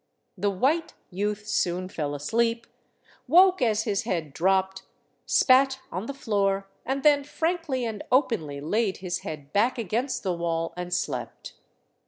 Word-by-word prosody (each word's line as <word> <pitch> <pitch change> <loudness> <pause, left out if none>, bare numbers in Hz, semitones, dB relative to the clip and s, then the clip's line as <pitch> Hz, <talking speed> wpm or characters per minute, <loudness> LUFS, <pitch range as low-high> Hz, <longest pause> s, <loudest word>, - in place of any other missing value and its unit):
The 200 +1 0
white 270 - 0 0.2
youth 205 +2 -2
soon 185 -3 0
fell 150 -5 -3
asleep, 230 +10 0 0.6
woke 365 +5 +6
as 220 -3 +2
his 205 -3 0
head 160 -6 -3
dropped, 190 +2 +1 0.5
spat 265 0 +4
on 185 +6 -4
the 280 - -4
floor, 200 -5 0 0.2
and 270 +1 -1
then 290 -2 +5
frankly 320 -4 -2
and 220 -3 -4
openly 205 - +1
laid 200 +6 0
his 180 -2 -3
head 145 -2 -8
back 235 +6 +2
against 235 +5 -2
the 185 -3 0
wall 165 -1 -2
and 180 0 -5
slept. - - -3
210 Hz, 145 wpm, -26 LUFS, 180-255 Hz, 0.6 s, woke